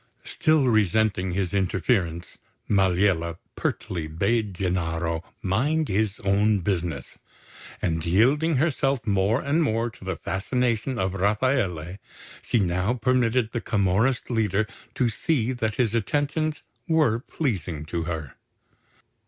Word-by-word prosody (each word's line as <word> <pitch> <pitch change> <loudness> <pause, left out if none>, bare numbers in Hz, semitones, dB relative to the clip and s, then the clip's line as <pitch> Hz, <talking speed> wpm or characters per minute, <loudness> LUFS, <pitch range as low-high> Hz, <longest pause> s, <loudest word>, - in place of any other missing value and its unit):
Still 155 -3 +2
resenting 105 -4 +2
his 95 -1 -1
interference, 95 -3 0 0.3
Maliella 90 -4 +2 0.2
pertly 90 -5 -3
bade 100 +5 0
Gennaro 85 -2 -1 0.2
mind 145 +12 +1
his 105 +1 0
own 100 +1 +2
business; 85 -8 -3 0.6
and 80 -1 0
yielding 130 - +3
herself 135 -3 +1
more 100 +3 +2
and 145 +4 +1
more 115 -5 0
to 110 - -16
the 95 0 -3
fascination 120 +4 -1
of 95 -3 -1
Rafaele, 100 - 0 0.4
she - - 0
now 95 +3 +1
permitted 125 -1 +1
the 120 - -2
Camorrist 110 +6 +1
leader 110 -3 +1 0.3
to 125 - +2
see 125 +1 0
that 110 -4 -2
his 115 -4 +1
attentions 145 +7 -1 0.2
were 155 -9 +3
pleasing 95 - -3
to 85 +1 -3
her. 80 -6 -4
105 Hz, 120 wpm, -25 LUFS, 90-125 Hz, 0.6 s, yielding